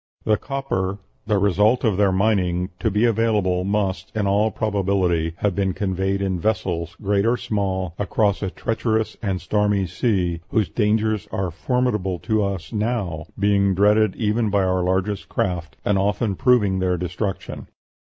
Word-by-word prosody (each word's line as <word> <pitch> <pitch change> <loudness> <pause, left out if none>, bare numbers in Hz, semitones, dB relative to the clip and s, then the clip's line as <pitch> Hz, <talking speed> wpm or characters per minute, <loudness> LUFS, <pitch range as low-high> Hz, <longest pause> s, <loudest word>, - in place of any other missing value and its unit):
The 110 - +3
copper, 100 -9 -2 0.3
the 105 -2 +2
result 105 +5 +3
of 110 -5 +2
their 100 0 +3
mining, 95 -3 +1
to 115 - +1
be 105 +3 +2
available, 105 -5 +1
must, 100 -1 -1
in 105 -2 0
all 100 +2 +2
probability, 95 -6 0
have 100 -1 0
been 95 0 0
conveyed 95 0 -1
in 95 -2 -1
vessels, 85 -4 -1
great 100 0 +2
or 115 +3 +2
small, 95 -5 -2
across 105 0 +1
a 95 - -1
treacherous 110 +1 -1
and 95 -4 -1
stormy 105 -1 +1
sea, 90 -2 -1
whose 110 -3 +1
dangers 110 -1 0
are 95 -2 -2
formidable 105 - -1
to 110 +2 0
us 100 +1 -4
now, 105 -8 -2
being 100 -1 +2
dreaded 105 +1 +3
even 110 0 0
by 100 -1 +2
our 95 0 +1
largest 95 +2 -1
craft, 85 -5 -2
and 100 -2 +2
often 100 +1 0
proving 105 -5 +3
their 90 -1 +1
destruction. 90 +3 -4
100 Hz, 155 wpm, -22 LUFS, 95-110 Hz, 0.3 s, The